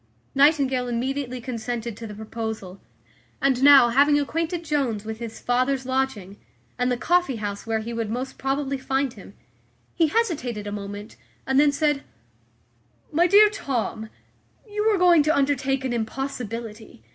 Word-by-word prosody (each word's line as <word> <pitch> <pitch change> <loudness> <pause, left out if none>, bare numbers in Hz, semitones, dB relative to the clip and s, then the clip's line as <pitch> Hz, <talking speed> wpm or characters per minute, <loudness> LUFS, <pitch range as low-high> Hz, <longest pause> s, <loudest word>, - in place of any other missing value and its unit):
Nightingale 275 -3 +3
immediately 255 +1 -2
consented 235 -2 -4
to 230 +1 -8
the 210 - -9
proposal; 220 -3 -6 0.6
and 265 -2 +1
now, 275 -3 +8
having 290 +4 +4
acquainted 330 +4 -2
Jones 265 -9 -1
with 220 0 -6
his 230 -2 -7
father's 255 +2 0
lodging, 260 -7 -2 0.4
and 250 0 +1
the 245 - 0
coffee 350 -1 +1
house 205 -1 -5
where 220 -1 0
he 235 +2 -6
would 230 -2 -3
most 250 +4 -5
probably 275 0 -1
find 270 -1 -1
him, - - -14 0.6
he 330 - +3
hesitated 280 - -1
a 205 - -5
moment, 205 +1 -7 0.3
and 265 +1 +2
then 295 0 +5
said, 295 -1 0 1.1
"My 335 +3 +3
dear 410 +3 +7
Tom, 230 - -3 0.6
you 420 0 -2
are 410 - +2
going 355 -3 +6
to 305 +2 +2
undertake 270 -1 0
an 250 - -1
impossibility. 230 - -5
260 Hz, 150 wpm, -24 LUFS, 225-285 Hz, 1.1 s, now